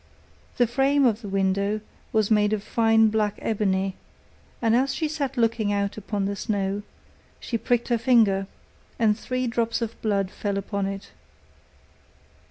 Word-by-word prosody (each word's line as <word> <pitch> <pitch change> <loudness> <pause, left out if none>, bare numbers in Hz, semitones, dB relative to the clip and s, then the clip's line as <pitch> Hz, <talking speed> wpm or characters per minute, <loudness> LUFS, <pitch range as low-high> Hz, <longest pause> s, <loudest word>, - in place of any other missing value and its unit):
The 245 - +5
frame 270 +4 +2
of 230 -2 +2
the 205 - -7
window 195 +2 +1 0.3
was 215 -1 +1
made 210 0 +3
of 205 -2 -2
fine 225 -1 +3
black 210 -1 0
ebony, 195 -3 0 0.6
and 230 -1 +2
as 270 +3 +1
she 315 - -1
sat 280 -4 -3
looking 230 -3 +1
out 200 -1 -1
upon 205 -1 -3
the 200 +1 -2
snow, 200 0 -2 0.6
she 235 - -4
pricked 240 +1 0
her 235 -1 +2
finger, 220 -6 +3 0.5
and 220 -3 +3
three 255 +3 -3
drops 230 -1 0
of 230 -1 -5
blood 200 -3 0
fell 200 -1 -3
upon 200 0 -2
it. 195 0 -6
215 Hz, 155 wpm, -25 LUFS, 200-235 Hz, 0.6 s, The